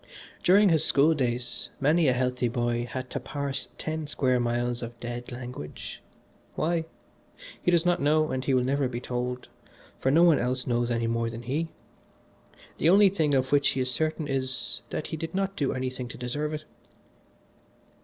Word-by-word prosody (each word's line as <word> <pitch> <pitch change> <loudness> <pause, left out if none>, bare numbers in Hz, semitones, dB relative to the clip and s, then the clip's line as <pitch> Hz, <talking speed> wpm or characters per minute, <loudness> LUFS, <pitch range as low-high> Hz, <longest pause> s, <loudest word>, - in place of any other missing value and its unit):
During 200 +3 +6
his 160 -3 +3
school 145 +4 +4
days 125 -4 -2
many 155 +3 +3
a 130 - +4
healthy 125 0 0
boy 120 0 -1
had 130 -1 -5
to - - -2
parse 140 -2 -3
ten 155 -1 -3
square 130 -4 +1
miles 120 0 0
of 120 0 -7
dead 120 +1 -6
language. 120 - -7 0.5
Why? 165 +1 0 0.8
he - - +1
does 170 -1 +3
not 175 0 +2
know 155 +2 +3
and 130 0 -2
he 135 -1 +2
will 125 - +3
never 135 +1 +1
be 120 -1 -4
told, 125 0 -3 0.5
for 130 - +1
no 160 +5 +5
one 170 -3 +6
else 125 +1 -1
knows 120 -1 0
any 115 -1 0
more 115 0 0
than 115 +1 -7
he. 145 +7 -1 1.1
The 160 - +4
only 200 +2 +7
thing 155 -7 +1
of 130 0 +1
which 145 0 +4
he - - -1
is 130 0 0
certain 155 +2 -1
is, 130 -1 -2
that - - -3
he 160 - -4
did 165 +2 -5
not 195 0 -1
do 140 -6 0
anything 130 -1 -3
to 140 +5 -9
deserve 145 +5 -2
it. 155 0 -8
130 Hz, 185 wpm, -27 LUFS, 125-155 Hz, 1.1 s, only